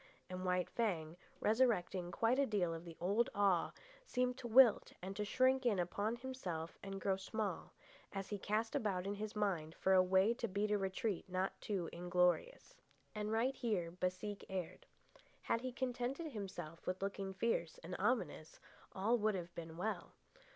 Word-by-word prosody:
And 185 0 -4
White 180 -1 +1
Fang, 170 -9 -1 0.2
resurrecting 210 -6 +2
quite 230 +8 +2
a 280 - +3
deal 185 -6 +1
of 165 +1 -7
the 165 -1 -9
old 205 +7 +2
awe, 195 -4 +3 0.4
seemed 250 0 +1
to 240 - -5
wilt 240 -1 +6
and 190 +2 -6
to 210 - -1
shrink 260 +5 +3
in 230 -5 +3
upon 200 +6 0
himself 215 -11 -5
and 195 0 -5
grow 190 0 +1
small, 200 -1 -3 0.4
as 195 -1 -4
he 205 - -3
cast 215 +3 0
about 190 -4 0
in 200 - -1
his 210 +1 -5
mind 175 -7 0
for 190 - +3
a 185 - +8
way 190 +4 +4
to 235 0 -3
beat 205 +1 0
a 210 - +4
retreat 195 0 -1
not 185 +1 0
too 190 -5 -1
inglorious. 180 - +1 0.4
And 210 0 -2
right 240 +5 +2
here 195 -9 -1
Baseek 185 +3 -3
erred. 190 - -4 0.6
Had 230 - +1
he 255 0 -3
contented 260 +5 -2
himself 190 - -6
with 185 +1 -1
looking 195 -1 -2
fierce 190 -5 0
and 180 +2 -5
ominous, 190 -8 0 0.3
all 225 +5 +2
would 215 -1 +2
have 175 -1 -5
been 165 -1 -7
well. 215 +5 -3
200 Hz, 170 wpm, -38 LUFS, 180-225 Hz, 0.6 s, a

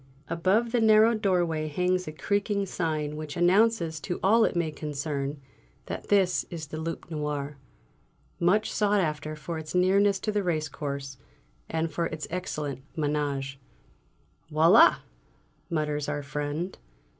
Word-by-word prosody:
Above 190 +8 +1
the 240 -1 +2
narrow 220 +1 +6
doorway 175 -7 +1
hangs 180 +3 0
a - - -3
creaking 200 +4 -1
sign 155 -5 -2
which 155 0 -6
announces 175 -2 +3
to 175 +3 -4
all 220 +4 +5
it - - +1
may 170 -2 0
concern 145 -1 -4 0.5
that - - -6
this 195 -3 +3
is 165 -3 -6
the 155 +1 -7
"Loup 165 0 -4
Noir," 150 -2 -3 0.8
much 185 +5 +2
sought 205 -1 +2
after 155 -3 -2
for 155 +2 -5
its 155 +1 -7
nearness 195 +2 +4
to 215 - -1
the 210 -1 0
racecourse 145 -5 -3 0.5
and 160 0 -1
for 165 +3 -1
its 155 -1 -5
excellent 150 -7 -4 0.2
ménage. 145 -3 -1 0.9
"Voilà!" 165 +7 +7 0.7
mutters 150 -3 -1
our 145 -1 -2
friend. 150 +5 -4
160 Hz, 135 wpm, -27 LUFS, 150-190 Hz, 0.9 s, Voilà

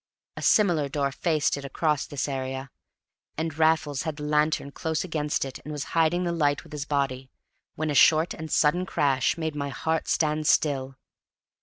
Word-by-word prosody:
A - - -7
similar 170 -9 +3
door 140 -1 -1
faced 155 0 0
it 140 - -7
across 150 +1 -1
this 145 -1 -3
area, 130 -1 -4 0.7
and 160 -1 -2
Raffles 155 -3 +2
had 160 -2 -3
the 150 - -8
lantern 150 -1 +1
close 160 +1 -2
against 150 -5 -1
it, 135 - -7
and 150 - -9
was 145 -2 -3
hiding 165 +2 +2
the 175 - -1
light 145 -4 +1
with - - -17
his 145 -1 -4
body, 135 -3 -2 0.5
when 155 -1 -2
a - - -1
short 160 +4 +5
and 160 0 -7
sudden 175 +5 +2
crash 140 -6 +1
made 160 -2 -2
my 140 -1 -3
heart 160 +3 -2
stand 155 -1 +1
still. 135 -4 +1
150 Hz, 180 wpm, -26 LUFS, 140-160 Hz, 0.7 s, short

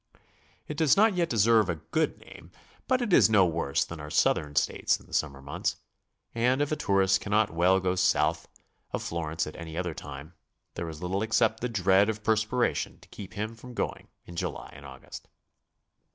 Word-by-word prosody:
It 150 - -6
does 155 -2 +4
not 215 +1 +5
yet 175 -2 0
deserve 110 -2 +4
a 85 - 0
good 80 - -2
name, 85 - -14 0.4
but 255 -1 +2
it 210 -6 -1
is - - +6
no 105 -4 +5
worse 80 -5 0
than 85 - -8
our 75 -1 -7
Southern 75 -1 +1
States 75 - +1
in - - -18
the - - -17
summer 70 -3 -1
months, 70 - -2 0.6
and 125 +3 +2
if 145 0 0
a - - +2
tourist 95 -5 +2
cannot 105 0 +1
well 90 +3 +3
go 90 -1 0
south 85 -3 +1 0.5
of - - -2
Florence 80 0 -2
at 75 - -8
any 80 -1 -8
other 90 -2 -2
time, 70 +3 -9 0.4
there 85 - -5
is 80 +2 -9
little 95 +2 -1
except 110 0 +2
the 125 - -2
dread 100 -1 +3
of 110 -1 -4
perspiration 110 +3 0
to - - -19
keep 100 -2 -10
him 110 +2 -3
from 125 +1 -12
going - - -3 0.2
in 85 - -11
July - - -5
or - - -10
August. - - -11
95 Hz, 195 wpm, -28 LUFS, 85-115 Hz, 0.6 s, is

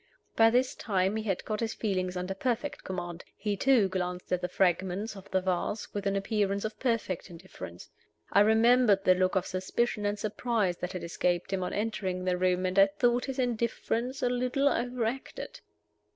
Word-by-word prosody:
By 225 0 +6
this 250 +2 +2
time 195 -1 0
he 220 - -1
had 195 -4 -1
got 215 -1 -2
his 225 -1 -2
feelings 185 -4 -1
under 180 +2 -2
perfect 245 +7 -2
command. 175 -2 -5
He, 205 0 -1
too, 240 -1 +4
glanced 180 -1 -3
at 180 - +1
the 180 - -1
fragments 190 +4 0
of 195 0 -12
the 190 0 +1
vase 185 +3 -2
with 205 -1 -2
an 195 - +1
appearance 200 0 0
of 220 - -5
perfect 230 -8 -1
indifference. 170 - -10 0.5
I 200 - +6
remembered 220 -1 +5
the 185 - +6
look 185 +1 +1
of 190 -1 +1
suspicion 205 +3 -1
and 205 +1 -1
surprise 215 -3 -1
that 180 - -4
had 180 - -5
escaped 175 +2 -1
him 190 - 0
on 180 - -2
entering 195 -4 -2
the 180 -1 +2
room, 185 0 +1
and 185 +2 +1
I 195 - +8
thought 240 +5 +1
his 270 -1 -5
indifference 240 +1 -1
a 245 - +3
little 250 +3 +1
overacted. 245 0 -3
200 Hz, 185 wpm, -29 LUFS, 185-230 Hz, 0.5 s, I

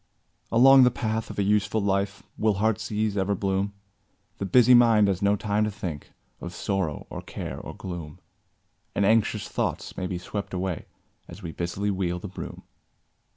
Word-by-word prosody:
Along 135 +3 +8
the 125 - +7
path 110 -2 -2
of - - -8
a 100 - +2
useful 105 +2 +2
life 100 0 -1
Will 110 -1 +1
heart's 110 +3 0
ease 105 -1 0
ever 100 0 +1
bloom; 95 +1 -1 0.7
The 100 - -2
busy 125 +5 +6
mind 115 -4 +6
has 95 -2 0
no 100 0 +3
time 105 +1 0
to - - -1
think 90 -8 -6 0.3
Of 85 0 -7
sorrow, 95 -7 -2
or - - -5
care, - - -6
or - - -8
gloom; 85 -5 -7 0.8
And 100 - +2
anxious 110 +1 +2
thoughts - - -3
may 95 - -2
be 90 - -3
swept 100 +2 -5
away 90 -2 -3 0.4
As - - -11
we 85 - -5
busily 90 +5 -2
wield 90 -1 -2
a - - -3
broom. 95 - -8
100 Hz, 175 wpm, -26 LUFS, 95-110 Hz, 0.8 s, Along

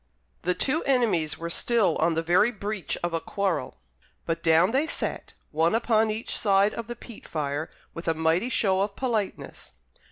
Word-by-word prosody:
The 180 +1 0
two 295 +5 0
enemies 220 - +1
were 170 0 -5
still 220 -4 +2
on 165 +1 +2
the 165 - 0
very 180 +7 +4
breach 210 -3 -4
of 175 -1 -1
a 165 - -1
quarrel; 190 -10 -2 0.5
but 165 0 -2
down 165 +4 +4
they 275 +5 +1
sat, - - -3 0.2
one 160 +5 +2
upon 225 -1 +2
each 215 +2 -3
side 200 0 +3
of 230 -2 -6
the 240 - -5
peat 235 -1 -12
fire, 145 0 -3 0.2
with 165 - -8
a 165 - +2
mighty 160 +8 +1
show 190 -6 +2
of 200 0 -2
politeness. 225 -7 -3
195 Hz, 180 wpm, -26 LUFS, 165-225 Hz, 0.5 s, very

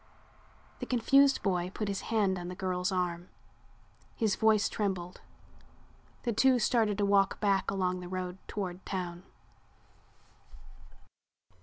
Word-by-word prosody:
The - - -5
confused 275 +3 +4
boy 180 -3 0
put 210 +1 -4
his 200 -1 -2
hand 200 -5 +1
on 175 - -6
the 180 - -6
girl's 180 0 -1
arm. 180 -1 -2 0.9
His 220 -3 +1
voice 220 -1 +3
trembled. 185 -4 -3 1.0
The 235 - 0
two 255 +4 +4
started 220 -3 +2
to 205 - +1
walk 200 -1 +3
back 200 -2 +1
along 185 -2 -1
the 180 -1 -8
road 185 0 -4
toward 185 -3 -5
town. 175 -2 -4
195 Hz, 125 wpm, -30 LUFS, 180-215 Hz, 1.0 s, confused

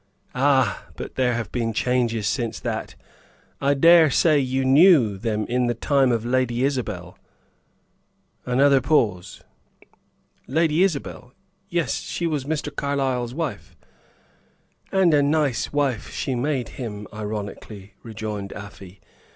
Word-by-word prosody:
"Ah! 135 -1 +1
But - - -7
there 125 -2 +1
have 115 -6 -4
been 115 -2 -2
changes 120 -2 0
since 120 -3 -2
that. - - -4 0.7
I 140 +1 +2
dare 165 +2 +6
say 155 +1 +3
you 130 0 -1
knew 135 - +5
them 110 -1 -2
in 125 +2 0
the 120 - -1
time 135 +1 +2
of 115 -1 -1
Lady 125 0 0
Isabel?" 105 -10 -3 1.2
Another 135 +2 +3
pause. 105 - 0 1.0
"Lady 160 +3 +1
Isabel? 140 -8 -2 0.4
Yes 170 -2 -1
she 170 - -4
was 150 -5 -2
Mr. 150 0 -3
Carlyle's 130 -4 -2
wife." 160 -4 -5 1.2
"And 190 -4 +3
a 145 - +5
nice 145 -3 0
wife 140 -6 -1
she 135 - -3
made 130 0 -2
him!" 105 -5 -7
ironically 105 -1 -7
rejoined 105 -3 -6
Afy. 100 -2 -11
125 Hz, 125 wpm, -23 LUFS, 110-145 Hz, 1.2 s, dare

